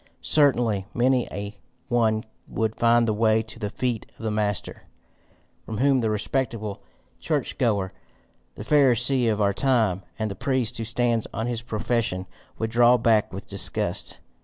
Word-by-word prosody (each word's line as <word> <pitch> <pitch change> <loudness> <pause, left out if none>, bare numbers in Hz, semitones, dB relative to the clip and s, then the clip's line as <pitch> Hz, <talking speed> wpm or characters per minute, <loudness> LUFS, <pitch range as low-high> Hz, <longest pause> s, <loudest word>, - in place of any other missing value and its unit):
Certainly 120 -9 +2
many 125 0 +2
a 100 +1 -6 0.3
one 110 -3 +1 0.2
would 110 -1 -2
find 115 0 +3
the 110 - +2
way 110 +1 +2
to 110 +1 -9
the 105 -2 -3
feet 120 0 -2
of - - -12
the 110 - -1
master, 105 -2 -2 0.8
from 110 - -6
whom 135 +2 +3
the 110 - 0
respectable 110 -1 -2 0.4
church 150 -5 -2
goer, 100 -7 +1 0.6
the - - -7
pharisee 130 -2 +3
of 105 - -2
our 100 -1 +2
time, 110 -6 +1 0.2
and 110 -2 -2
the - - -5
priest 125 +1 -1
who 115 - -3
stands 115 0 0
on 110 - -2
his 120 -2 -2
profession, 115 -4 -1 0.3
would 110 0 -2
draw 120 +1 +5
back 110 -3 +2
with 95 +2 -7
disgust. 100 -1 -2
115 Hz, 160 wpm, -25 LUFS, 105-120 Hz, 0.8 s, draw